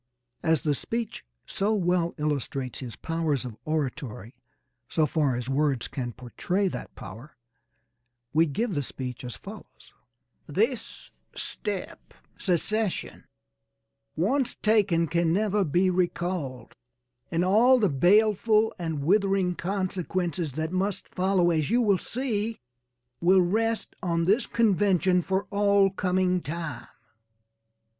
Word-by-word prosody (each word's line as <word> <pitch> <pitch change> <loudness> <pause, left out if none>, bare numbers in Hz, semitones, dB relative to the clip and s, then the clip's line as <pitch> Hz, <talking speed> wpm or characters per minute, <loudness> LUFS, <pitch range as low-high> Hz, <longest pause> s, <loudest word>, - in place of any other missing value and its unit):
As 160 -3 +2
the 150 - +1
speech 230 - -4 0.2
so 210 +3 0
well 175 -3 +1
illustrates 140 -4 -2
his 125 -4 -7
powers 160 -5 -1
of 120 -4 -6
oratory, 135 -6 -3 0.6
so 160 - +2
far 150 -5 +1
as 120 0 -4
words 135 -2 +1
can 125 -3 -4
portray 175 - -2
that - - -7
power, 115 +7 -11 1.0
we 165 +2 +4
give 210 - -1
the 145 - 0
speech 125 -2 -6
as 125 -1 -6
follows: 210 +2 -12 0.5
This 455 - -2 0.2
step, 200 -3 -5 0.2
secession, 200 +3 -1 0.9
once 245 - +1
taken 200 -6 +3
can 170 0 +1
never 205 +2 +2
be 180 +3 +2
recalled, 175 -8 -2 0.6
and 170 +2 +1
all 235 +7 +5
the 215 -4 +3
baleful 215 - +3
and 160 -4 -3
withering 195 +1 +2
consequences 180 -4 -2
that 160 +3 -3
must 190 +2 -2
follow, 185 -2 +2
as 155 -2 0
you 235 +3 +3
will 205 -6 +3
see, 230 -3 -2 0.6
will 185 +2 +5
rest 225 +5 -1
on 170 -3 0
this 205 +8 +2
convention 195 -4 +3
for 190 +3 -1
all 200 -1 +4
coming 185 -1 +1
time. 155 -5 -5
180 Hz, 120 wpm, -27 LUFS, 150-200 Hz, 1.0 s, all